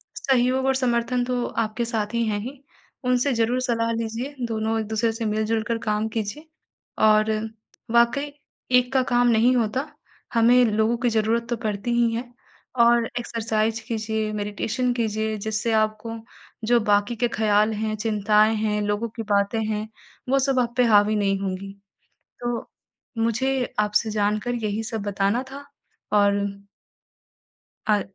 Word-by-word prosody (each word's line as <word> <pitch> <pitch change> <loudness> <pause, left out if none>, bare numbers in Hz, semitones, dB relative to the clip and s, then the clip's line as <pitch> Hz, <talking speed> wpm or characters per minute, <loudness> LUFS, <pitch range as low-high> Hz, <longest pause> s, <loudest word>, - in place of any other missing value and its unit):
सहयोग 260 0 +1
और 265 - +3
समर्थन 245 -1 +1
तो 245 -1 -1
आपके 225 +1 -2
साथी 230 0 -1
हैं 205 -1 -1
ही, 260 +6 -8 0.4
उनसे 250 +2 +2
ज़रूर 235 +2 +1
सलाह 230 -2 0
लीजिए, 230 +5 -4
दोनों 225 0 -1
एक-दूसरे 220 +1 0
से 225 0 -4
मिल-जुल 215 +1 0
कर 230 - 0
काम 210 +1 +1
कीजिए 225 +8 -4 0.6
और 215 0 +4 0.6
वाक़ई 235 +5 +3 0.5
एक 250 +1 0
का 260 -1 +3
काम 245 -1 +2
नहीं 235 +2 +4
होता, 245 +5 -1 0.5
हमें 240 +2 +5
लोगों 220 +1 +1
की 240 +1 +1
ज़रूरत 225 +1 0
तो 240 - 0
पड़ती 215 +1 -3
ही 235 -1 +2
है 235 +2 -3 0.5
और 235 0 +5
एक्सरसाइज़ 225 -1 -1
कीजिए, 220 -1 -2
मेडिटेशन 210 +4 -1
कीजिए, 220 -2 -1
जिससे 215 +2 -2
आपको 215 +1 -1 0.5
जो 240 +1 +4
बाक़ी 205 +1 +1
के 240 +2 +1
ख़्याल 215 -1 +2
हैं, 215 0 -2
चिंताएँ 215 0 +2
हैं, 210 -1 0
लोगों 205 +3 -1
की 225 - -3
बातें 205 +1 +1
हैं, 215 0 -2 0.4
वो 275 +1 +3
सब 270 -1 +1
आप 240 -1 0
पे 250 - +5
हावी 210 -1 +4
नहीं 195 -2 +1
होंगी। 195 0 -4 0.7
तो 240 -1 -3 0.5
मुझे 250 +3 0
आपसे 210 +1 +1
जानकर 210 +3 0
यही 210 +1 -1
सब 225 -1 -4
बताना 200 +3 0
था 280 +1 -9 0.5
और 205 -1 +4 1.6
अ, 210 -1 +3
225 Hz, 145 wpm, -24 LUFS, 215-240 Hz, 1.6 s, हमें